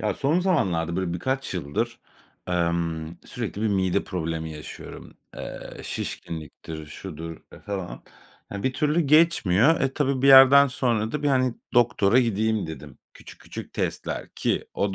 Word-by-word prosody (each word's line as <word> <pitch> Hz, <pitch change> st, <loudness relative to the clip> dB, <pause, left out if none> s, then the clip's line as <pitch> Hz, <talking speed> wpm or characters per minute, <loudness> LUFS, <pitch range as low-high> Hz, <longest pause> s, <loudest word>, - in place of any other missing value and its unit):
Ya 105 Hz, -2 st, 0 dB
son 150 Hz, +6 st, +1 dB
zamanlarda 90 Hz, -, 0 dB
böyle 95 Hz, -2 st, -1 dB
birkaç 130 Hz, +8 st, -2 dB
yıldır, 75 Hz, -5 st, -3 dB, 0.5 s
emm, 85 Hz, -2 st, -1 dB
sürekli 110 Hz, -3 st, -5 dB
bir 110 Hz, -, +2 dB
mide 95 Hz, -1 st, +1 dB
problemi 80 Hz, -3 st, -4 dB
yaşıyorum. 75 Hz, -1 st, -10 dB, 0.2 s
Eee, -, -, -8 dB
şişkinliktir, 80 Hz, -1 st, -6 dB
şudur 80 Hz, +1 st, -8 dB, 0.3 s
falan. 95 Hz, -3 st, -5 dB, 0.5 s
Ya, 100 Hz, -1 st, -5 dB
bir 130 Hz, -, 0 dB
türlü 150 Hz, +4 st, +1 dB
geçmiyor. 150 Hz, -, +4 dB
E, 135 Hz, -1 st, +1 dB
tabii 135 Hz, -3 st, 0 dB
bir 140 Hz, -, +5 dB
yerden 135 Hz, +1 st, +9 dB
sonra 120 Hz, -5 st, -1 dB
da 150 Hz, -, -3 dB
bir, 145 Hz, -, +2 dB
hani, 130 Hz, -3 st, +2 dB, 0.2 s
doktora 120 Hz, -2 st, +4 dB
gideyim 110 Hz, -3 st, 0 dB
dedim. 75 Hz, -4 st, -9 dB, 0.2 s
Küçük -, -, -14 dB
küçük -, -, -9 dB
testler -, -, -3 dB
ki -, -, -1 dB
o 100 Hz, -1 st, -1 dB
100 Hz, 145 wpm, -25 LUFS, 85-135 Hz, 0.5 s, yerden